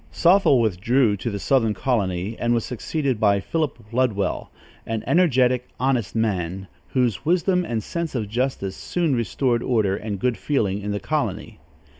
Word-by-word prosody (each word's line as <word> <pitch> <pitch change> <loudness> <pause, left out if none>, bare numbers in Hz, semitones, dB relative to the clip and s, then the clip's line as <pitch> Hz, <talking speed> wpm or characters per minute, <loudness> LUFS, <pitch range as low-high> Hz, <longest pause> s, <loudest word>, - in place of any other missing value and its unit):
Sothel 175 -6 +4
withdrew 110 +2 +2
to 105 - -3
the 100 - -3
southern 115 -1 +1
colony, 100 -4 -1
and 120 0 +1
was 115 - -1
succeeded 130 0 -2
by 100 -2 +3
Philip 155 +7 -2
Ludwell, 115 -5 0 0.3
an 115 -1 -3
energetic, 130 -8 +2
honest 125 -6 0
man, 95 -4 -1 0.2
whose 120 -8 0
wisdom 180 +2 +2
and 115 -9 -3
sense 170 -4 -4
of 110 -4 -2
justice 115 -4 -2
soon 170 -6 -1
restored 120 +1 0
order 110 -7 +1
and 105 -1 -4
good 125 +4 0
feeling 105 -9 0
in 105 - -4
the 105 - -2
colony. - - -3
120 Hz, 155 wpm, -23 LUFS, 105-135 Hz, 0.3 s, Sothel